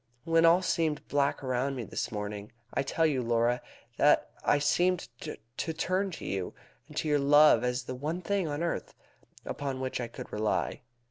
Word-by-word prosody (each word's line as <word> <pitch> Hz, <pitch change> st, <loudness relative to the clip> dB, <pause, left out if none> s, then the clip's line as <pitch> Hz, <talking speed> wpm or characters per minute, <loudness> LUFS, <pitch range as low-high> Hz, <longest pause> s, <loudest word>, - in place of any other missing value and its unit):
When 165 Hz, +1 st, +4 dB
all 170 Hz, +3 st, +6 dB
seemed 160 Hz, -4 st, 0 dB
black 140 Hz, 0 st, +1 dB
around 130 Hz, +1 st, 0 dB
me 125 Hz, -, -4 dB
this -, -, -4 dB
morning, 105 Hz, -1 st, -5 dB, 0.2 s
I -, -, +1 dB
tell 160 Hz, +4 st, +1 dB
you, 140 Hz, -5 st, +2 dB
Laura, 120 Hz, +1 st, +1 dB, 0.4 s
that -, -, +4 dB
I 145 Hz, -, +4 dB
seemed 175 Hz, +5 st, +1 dB
to 115 Hz, +8 st, -6 dB
turn 185 Hz, +4 st, 0 dB
to -, -, -7 dB
you 95 Hz, -2 st, -3 dB, 0.3 s
and -, -, -12 dB
to -, -, 0 dB
your 150 Hz, -1 st, +3 dB
love 145 Hz, -3 st, +6 dB
as 125 Hz, +1 st, -1 dB
the 130 Hz, -, -5 dB
one 155 Hz, +8 st, -3 dB
thing 200 Hz, -2 st, 0 dB
on 150 Hz, +2 st, -2 dB
earth 170 Hz, -, -3 dB, 0.5 s
upon 135 Hz, -2 st, -3 dB
which 130 Hz, -1 st, -2 dB
I 120 Hz, -, -3 dB
could 115 Hz, -, -10 dB
rely. 105 Hz, 0 st, -1 dB
140 Hz, 185 wpm, -30 LUFS, 125-165 Hz, 0.5 s, all